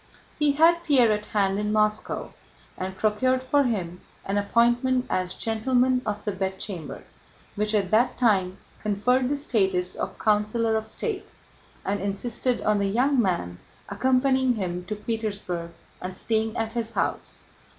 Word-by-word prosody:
He 295 Hz, -1 st, +3 dB
had 335 Hz, +3 st, +4 dB
Pierre 260 Hz, -8 st, +4 dB
at 210 Hz, 0 st, -2 dB
hand 195 Hz, -1 st, +1 dB
in 210 Hz, 0 st, -1 dB
Moscow 215 Hz, 0 st, 0 dB, 0.4 s
and 190 Hz, +1 st, -5 dB
procured 255 Hz, +5 st, +1 dB
for 280 Hz, +2 st, +2 dB
him 180 Hz, -7 st, -2 dB, 0.2 s
an 200 Hz, +1 st, 0 dB
appointment 240 Hz, +4 st, +2 dB
as 185 Hz, -1 st, -1 dB
Gentleman 250 Hz, +3 st, +1 dB
of 210 Hz, -1 st, -3 dB
the 210 Hz, -, 0 dB
Bedchamber, 190 Hz, -3 st, -5 dB, 0.5 s
which 210 Hz, +1 st, 0 dB
at 195 Hz, -3 st, 0 dB
that 235 Hz, +4 st, +3 dB
time 195 Hz, -6 st, +2 dB, 0.2 s
conferred 250 Hz, +5 st, +1 dB
the 290 Hz, -, 0 dB
status 190 Hz, -10 st, 0 dB
of -, -, -5 dB
Councilor 215 Hz, +2 st, +1 dB
of 220 Hz, 0 st, -2 dB
State, 390 Hz, -, -4 dB, 0.6 s
and 200 Hz, 0 st, -1 dB
insisted 235 Hz, +5 st, -1 dB
on 210 Hz, -1 st, +2 dB
the 200 Hz, -, +1 dB
young 250 Hz, +6 st, +2 dB
man 170 Hz, -, -1 dB, 0.3 s
accompanying 260 Hz, +3 st, +2 dB
him 180 Hz, -3 st, -3 dB
to 210 Hz, -, -4 dB
Petersburg 205 Hz, -6 st, -3 dB, 0.3 s
and 185 Hz, 0 st, -5 dB
staying 220 Hz, 0 st, -1 dB
at 225 Hz, 0 st, -2 dB
his 230 Hz, -2 st, -2 dB
house. -, -, -2 dB
215 Hz, 150 wpm, -25 LUFS, 195-250 Hz, 0.6 s, had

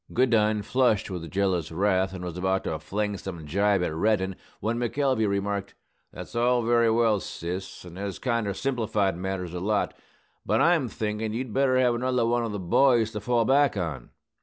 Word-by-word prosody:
Goodine 110 Hz, -4 st, +2 dB
flushed 115 Hz, -5 st, +1 dB
with 85 Hz, -3 st, -5 dB
jealous 95 Hz, -5 st, 0 dB
wrath, 95 Hz, +2 st, +1 dB
and 95 Hz, -1 st, -6 dB
was 85 Hz, -2 st, -5 dB
about 95 Hz, +1 st, 0 dB
to 80 Hz, -, -3 dB
fling 105 Hz, +5 st, -2 dB
some 90 Hz, -5 st, -7 dB
gibe 100 Hz, +4 st, +2 dB
at 80 Hz, -, -2 dB
Reddin, 95 Hz, +1 st, +1 dB, 0.2 s
when 115 Hz, +2 st, -1 dB
McElvey 125 Hz, -2 st, +1 dB
remarked, 100 Hz, 0 st, -2 dB, 0.4 s
"That's -, -, -9 dB
all 120 Hz, +1 st, +2 dB
very 115 Hz, 0 st, +3 dB
well, 110 Hz, -2 st, +3 dB
sis; 90 Hz, +1 st, -6 dB
and 90 Hz, +1 st, -10 dB
has 100 Hz, -1 st, -4 dB
kinder 115 Hz, -6 st, -1 dB
simplified 110 Hz, -7 st, 0 dB
matters 90 Hz, -1 st, -4 dB
a 90 Hz, -, -3 dB
lot. 105 Hz, +3 st, 0 dB, 0.5 s
But -, -, +1 dB
I'm 165 Hz, -6 st, +3 dB
thinkin' 110 Hz, -1 st, -3 dB
you'd 120 Hz, -1 st, -4 dB
better 135 Hz, -1 st, +3 dB
have 125 Hz, -2 st, +3 dB
another 125 Hz, 0 st, 0 dB
one 120 Hz, +1 st, +1 dB
of 115 Hz, -, -3 dB
the 105 Hz, -, -3 dB
boys 115 Hz, +4 st, +3 dB
to 105 Hz, -, -5 dB
fall 120 Hz, +1 st, +1 dB
back 140 Hz, -2 st, +3 dB
on. 80 Hz, -9 st, -4 dB
105 Hz, 185 wpm, -26 LUFS, 95-120 Hz, 0.5 s, very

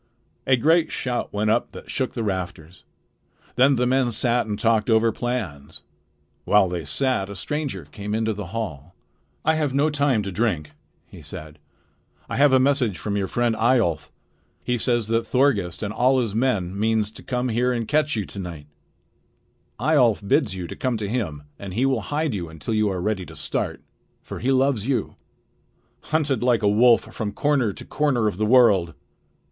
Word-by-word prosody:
A 130 Hz, -, +5 dB
great 160 Hz, +6 st, +3 dB
shout 125 Hz, -3 st, -2 dB
went 105 Hz, +1 st, 0 dB
up 115 Hz, -, 0 dB
that -, -, -9 dB
shook 130 Hz, -2 st, -2 dB
the 115 Hz, -, -2 dB
rafters. 90 Hz, -4 st, -5 dB, 0.7 s
Then 135 Hz, +3 st, +5 dB
the 125 Hz, 0 st, +1 dB
men 130 Hz, 0 st, +2 dB
sat 120 Hz, +1 st, +1 dB
and 105 Hz, -1 st, -3 dB
talked 110 Hz, 0 st, +1 dB
over 115 Hz, 0 st, +4 dB
plans. 105 Hz, -, -5 dB, 0.6 s
While 105 Hz, -2 st, +4 dB
they 85 Hz, -3 st, -4 dB
sat, 100 Hz, -, -1 dB
a 100 Hz, -, -7 dB
stranger 115 Hz, -, -4 dB
came 100 Hz, +7 st, -5 dB
into 110 Hz, 0 st, 0 dB
the 100 Hz, -3 st, -6 dB
hall. 90 Hz, -6 st, -6 dB, 0.5 s
"I 160 Hz, -, +4 dB
have 150 Hz, -4 st, -1 dB
no 150 Hz, +3 st, +2 dB
time 140 Hz, -7 st, +1 dB
to 100 Hz, -, -4 dB
drink," 90 Hz, -7 st, -1 dB, 0.3 s
he -, -, -14 dB
said. 75 Hz, -1 st, -9 dB, 0.7 s
"I -, -, -4 dB
have 145 Hz, 0 st, +5 dB
a 130 Hz, -, +5 dB
message 130 Hz, -7 st, +1 dB
from 105 Hz, -1 st, -3 dB
your 100 Hz, -1 st, -1 dB
friend 120 Hz, +1 st, 0 dB
Eyjolf. 110 Hz, -9 st, +1 dB, 0.5 s
He 125 Hz, -, 0 dB
says 120 Hz, -2 st, 0 dB
that 115 Hz, 0 st, 0 dB
Thorgest 110 Hz, -10 st, +1 dB
with 105 Hz, -, -2 dB
all 130 Hz, +4 st, +3 dB
his 115 Hz, -5 st, -1 dB
men 100 Hz, -6 st, 0 dB
means 110 Hz, -1 st, +1 dB
to -, -, -13 dB
come 125 Hz, 0 st, -2 dB
here 120 Hz, +2 st, +1 dB
and 115 Hz, -3 st, -2 dB
catch 150 Hz, -2 st, +1 dB
you 105 Hz, -3 st, -2 dB
to 100 Hz, -, -8 dB
night. 85 Hz, -5 st, -7 dB, 1.1 s
Eyjolf 120 Hz, -7 st, +2 dB
bids 100 Hz, -1 st, +2 dB
you 90 Hz, -2 st, -5 dB
come 125 Hz, +4 st, -2 dB
to 105 Hz, -2 st, -3 dB
him, 95 Hz, -11 st, -3 dB, 0.2 s
and 95 Hz, -2 st, -7 dB
he 125 Hz, -, +2 dB
will 130 Hz, -4 st, +1 dB
hide 150 Hz, +4 st, -2 dB
you 85 Hz, -5 st, -4 dB
until 80 Hz, +6 st, -5 dB
you 110 Hz, -1 st, +2 dB
are 95 Hz, -2 st, -2 dB
ready 100 Hz, 0 st, -1 dB
to -, -, -11 dB
start; -, -, -3 dB, 0.4 s
for -, -, -7 dB
he 130 Hz, +4 st, 0 dB
loves 130 Hz, -4 st, +1 dB
you." 125 Hz, -7 st, -1 dB, 0.9 s
"Hunted 150 Hz, -6 st, 0 dB
like 120 Hz, -3 st, +2 dB
a -, -, +4 dB
wolf 115 Hz, +3 st, +5 dB
from 105 Hz, -2 st, -3 dB
corner 135 Hz, -4 st, +1 dB
to -, -, -10 dB
corner 130 Hz, -7 st, +1 dB
of 100 Hz, -, -2 dB
the 110 Hz, +1 st, 0 dB
world!" 105 Hz, -, +4 dB
115 Hz, 185 wpm, -23 LUFS, 100-130 Hz, 1.1 s, A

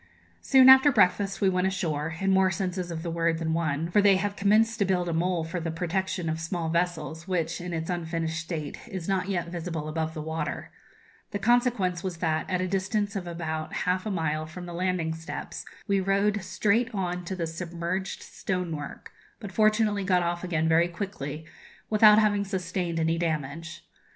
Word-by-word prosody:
Soon 260 Hz, -1 st, +6 dB
after 265 Hz, +2 st, +9 dB
breakfast 195 Hz, -3 st, +2 dB
we 195 Hz, -, +4 dB
went 185 Hz, 0 st, +1 dB
ashore 160 Hz, -4 st, -2 dB
in 195 Hz, 0 st, +1 dB
more 190 Hz, 0 st, +4 dB
senses 185 Hz, -1 st, -3 dB
of 165 Hz, -1 st, -5 dB
the 170 Hz, -, -3 dB
word 165 Hz, 0 st, +1 dB
than 160 Hz, -1 st, -1 dB
one; 160 Hz, 0 st, -1 dB
for 205 Hz, -, +5 dB
they 200 Hz, -1 st, +6 dB
have 200 Hz, +2 st, -1 dB
commenced 220 Hz, +3 st, +3 dB
to -, -, +4 dB
build 180 Hz, -2 st, +1 dB
a 170 Hz, -, -1 dB
mole 170 Hz, 0 st, 0 dB
for 165 Hz, +2 st, -4 dB
the 165 Hz, 0 st, -3 dB
protection 180 Hz, +1 st, -2 dB
of 160 Hz, 0 st, -1 dB
small 165 Hz, 0 st, -3 dB
vessels, 170 Hz, -1 st, -2 dB
which, 170 Hz, -3 st, -1 dB
in 180 Hz, 0 st, -5 dB
its 160 Hz, -1 st, -3 dB
unfinished 165 Hz, -2 st, -2 dB
state, 160 Hz, -2 st, -5 dB
is 190 Hz, -7 st, -6 dB
not 195 Hz, -1 st, 0 dB
yet 175 Hz, -3 st, -1 dB
visible 165 Hz, -3 st, -4 dB
above 160 Hz, +1 st, -3 dB
the 155 Hz, -, -4 dB
water. 160 Hz, +1 st, -4 dB, 0.6 s
The -, -, -3 dB
consequence 220 Hz, -6 st, +2 dB
was 185 Hz, -3 st, -3 dB
that, 160 Hz, -2 st, -1 dB
at 185 Hz, -1 st, 0 dB
a 185 Hz, -, 0 dB
distance 195 Hz, +2 st, -1 dB
of 185 Hz, -3 st, -4 dB
about 160 Hz, -2 st, -4 dB
half 180 Hz, +1 st, +1 dB
a -, -, -1 dB
mile 155 Hz, -4 st, -1 dB
from 175 Hz, +3 st, -8 dB
the 175 Hz, -, -7 dB
landing 175 Hz, -2 st, -1 dB
steps, 160 Hz, 0 st, -7 dB, 0.2 s
we 200 Hz, -1 st, +2 dB
rowed 200 Hz, +2 st, +1 dB
straight 220 Hz, +5 st, +1 dB
on 180 Hz, -2 st, -2 dB
to 190 Hz, -, -4 dB
the 170 Hz, -2 st, -2 dB
submerged 170 Hz, +3 st, -4 dB
stonework, 170 Hz, -6 st, -4 dB, 0.3 s
but 205 Hz, -4 st, -7 dB
fortunately 215 Hz, -1 st, +2 dB
got 180 Hz, -2 st, +2 dB
off 175 Hz, +1 st, -2 dB
again 165 Hz, -3 st, 0 dB
very 165 Hz, +1 st, +4 dB
quickly, 160 Hz, -5 st, -5 dB, 0.5 s
without 215 Hz, 0 st, +7 dB
having 205 Hz, -2 st, +3 dB
sustained 180 Hz, -3 st, -2 dB
any 165 Hz, +1 st, +1 dB
damage. 160 Hz, 0 st, -3 dB
180 Hz, 190 wpm, -27 LUFS, 165-195 Hz, 0.6 s, after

